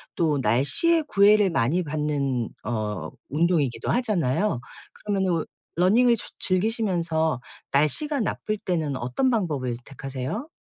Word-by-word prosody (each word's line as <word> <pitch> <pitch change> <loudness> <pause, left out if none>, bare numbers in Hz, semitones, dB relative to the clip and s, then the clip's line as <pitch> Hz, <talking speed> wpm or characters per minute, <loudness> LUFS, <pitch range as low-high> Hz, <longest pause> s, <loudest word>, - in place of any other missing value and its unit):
또 150 -4 +1
날씨에 140 - +3
구애를 205 -1 +5
많이 165 +7 +1
받는 145 -5 -1 0.2
어 110 -2 -3 0.2
운동이기도 150 -4 0
하잖아요. 205 - +1 0.3
그러면은 195 -3 -1
어 - - -2 0.3
러닝을 230 +6 +4
저 - - -6
즐기시면서 180 - 0 0.3
날씨가 265 - +2
나쁠 215 0 -2
때는 160 -9 -2
어떤 125 - 0
방법을 150 - -1
택하세요? 135 - -5
165 Hz, 290 characters per minute, -25 LUFS, 135-210 Hz, 0.3 s, 구애를